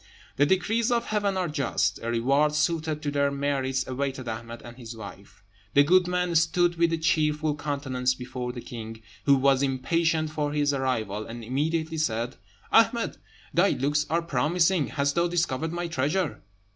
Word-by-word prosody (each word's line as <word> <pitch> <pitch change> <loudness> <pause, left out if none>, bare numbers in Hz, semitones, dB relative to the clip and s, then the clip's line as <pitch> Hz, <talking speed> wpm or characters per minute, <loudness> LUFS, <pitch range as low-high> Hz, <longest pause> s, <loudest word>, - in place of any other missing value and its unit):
The 145 - +4
decrees 225 - +1
of 235 -1 +1
Heaven 205 -2 0
are 185 -1 0
just: 145 -5 0
a 115 - -3
reward 140 +6 +2
suited 155 -1 0
to 145 - -1
their 140 0 +2
merits 135 -2 -1
awaited 130 -1 -3
Ahmed 115 +1 -6
and 120 0 -10
his 120 -2 -9
wife. 100 -1 -11 0.3
The 140 - +7
good 180 +4 +4
man 180 -1 0
stood 170 +2 +3
with 170 0 +2
a 165 - +1
cheerful 155 -1 +1
countenance 130 -4 -1
before 125 -1 -5
the 125 -1 -7
king, 115 -3 -8 0.2
who 140 - +6
was 135 0 +3
impatient 155 +4 +1
for 150 -1 -2
his 145 -1 +1
arrival, 110 -6 -2
and 115 0 -8
immediately 160 +6 -1
said, 120 -5 -1 0.3
"Ahmed, - - +3 0.4
thy - - +4
looks 145 +2 0
are 170 +1 +1
promising; 165 +2 +1
hast 140 +5 0
thou 170 0 +2
discovered 165 -3 -1
my 175 0 -3
treasure?" 150 - -1
145 Hz, 170 wpm, -26 LUFS, 130-165 Hz, 0.4 s, The